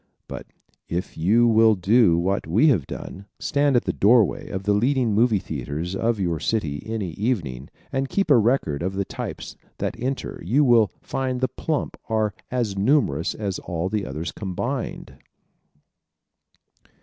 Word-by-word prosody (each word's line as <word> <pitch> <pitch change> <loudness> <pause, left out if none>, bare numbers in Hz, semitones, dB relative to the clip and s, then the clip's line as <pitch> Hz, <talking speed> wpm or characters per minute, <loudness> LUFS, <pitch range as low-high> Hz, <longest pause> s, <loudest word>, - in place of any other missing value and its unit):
But - - -7 0.4
if 90 +2 -3
you 105 +9 +3
will 110 -1 +5
do 100 -2 +4
what 95 +2 0
we 110 - +4
have 90 - +2
done 100 +2 -8
stand 145 -2 +1
at 120 - +3
the - - 0
doorway 110 -1 +3
of 95 - -4
the 105 +1 +2
leading 120 +1 +2
movie 110 +1 +3
theaters 80 +1 -4
of 115 +2 0
your 85 -4 -1
city 75 -10 -1
any 110 -6 -3
evening 80 - -2 0.2
and 135 0 -1
keep 195 -6 0
a 135 - +8
record 110 - +1
of 95 +2 -2
the 100 0 -1
types - - -6 0.2
that - - -2
enter 130 +2 -3
you 125 - +3
will 120 -5 +4
find 130 -1 -2
the 130 - +1
plump 155 -2 -3
are 110 -2 +1 0.2
as 120 -6 -1
numerous 100 - +1
as 100 -4 -3
all 85 0 -3
the 105 -1 -2
others 75 +6 -4
combined. 110 +7 -4
105 Hz, 160 wpm, -23 LUFS, 90-125 Hz, 0.4 s, a